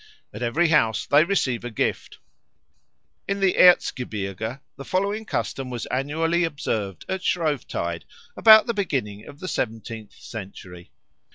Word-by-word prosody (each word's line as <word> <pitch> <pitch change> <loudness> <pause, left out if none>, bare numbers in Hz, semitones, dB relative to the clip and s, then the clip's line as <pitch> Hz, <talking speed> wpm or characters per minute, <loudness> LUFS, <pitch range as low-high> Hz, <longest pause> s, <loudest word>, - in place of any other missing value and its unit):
At 110 - -8
every 155 +9 +1
house 115 - +2
they 145 +2 +5
receive 160 -11 0
a 120 - -4
gift. 110 - -2 1.1
In 200 0 -1
the 195 -2 +2
Erzgebirge 115 - +2 0.2
the 140 - -9
following 200 +7 -1
custom 135 -9 -3
was 120 -2 -5
annually 160 +6 0
observed 110 - -3
at 190 -1 -3
Shrovetide 145 - -2 0.3
about 220 -1 +8
the 235 - -1
beginning 125 - -3
of 145 - -12
the 185 - -6
seventeenth 115 - -4
century. 95 -5 -10
135 Hz, 130 wpm, -24 LUFS, 110-175 Hz, 1.1 s, about